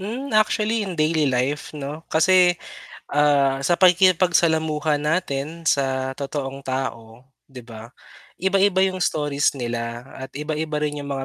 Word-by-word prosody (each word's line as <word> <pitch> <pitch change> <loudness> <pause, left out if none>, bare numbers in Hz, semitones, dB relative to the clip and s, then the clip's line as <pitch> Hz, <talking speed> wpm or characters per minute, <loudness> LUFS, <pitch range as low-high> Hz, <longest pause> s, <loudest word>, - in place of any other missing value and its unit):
Hmm, 245 +8 -5
actually 215 +1 +2
in 180 - -6
daily 155 -1 +1
life 130 +4 -1
'no? 145 +2 -6
Kasi, 180 +2 +4 0.5
ah, 140 -2 +2
sa 175 - +2
pakikipagsalamuha 165 -4 +3
natin, 155 0 -2
sa 130 -3 0
totoong 135 0 -5
tao, 125 -3 -5 0.2
di 130 -3 -11
ba? 115 -1 -11 0.5
Iba-iba 190 0 +2
yung 185 -1 -2
stories 145 -4 0
nila, 120 -1 -4
at 130 0 -8
iba-iba 155 +1 -3
rin 150 -1 -3
yung 140 - -7
mga 135 -1 -3
150 Hz, 135 wpm, -22 LUFS, 135-175 Hz, 0.5 s, Kasi